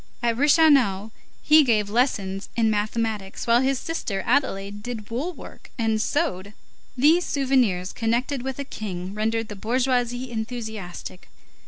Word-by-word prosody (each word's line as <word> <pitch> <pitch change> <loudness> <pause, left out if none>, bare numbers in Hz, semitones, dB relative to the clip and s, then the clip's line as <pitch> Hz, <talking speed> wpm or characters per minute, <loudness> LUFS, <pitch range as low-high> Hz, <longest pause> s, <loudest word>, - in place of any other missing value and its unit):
At 235 -1 +2
Reichenau, 270 - +4 0.3
he 310 0 +7
gave 215 -6 +2
lessons 200 -4 -1
in 225 -2 +2
mathematics, 215 -1 -2
while 235 +1 +4
his 265 0 +1
sister 220 -11 -3
Adelaide 205 -6 0
did 225 -2 -7
wool 275 +10 -2
work - - -13
and 220 -2 +1
sewed. 215 - -1 0.4
These 315 +7 +5
souvenirs 255 - +1
connected 245 +4 -1
with 265 0 -4
a 280 - -3
king 190 -7 -6
rendered 225 +1 -1
the 210 - -7
bourgeoisie 245 +3 -1
enthusiastic. 220 -6 -6
230 Hz, 135 wpm, -24 LUFS, 205-260 Hz, 0.4 s, he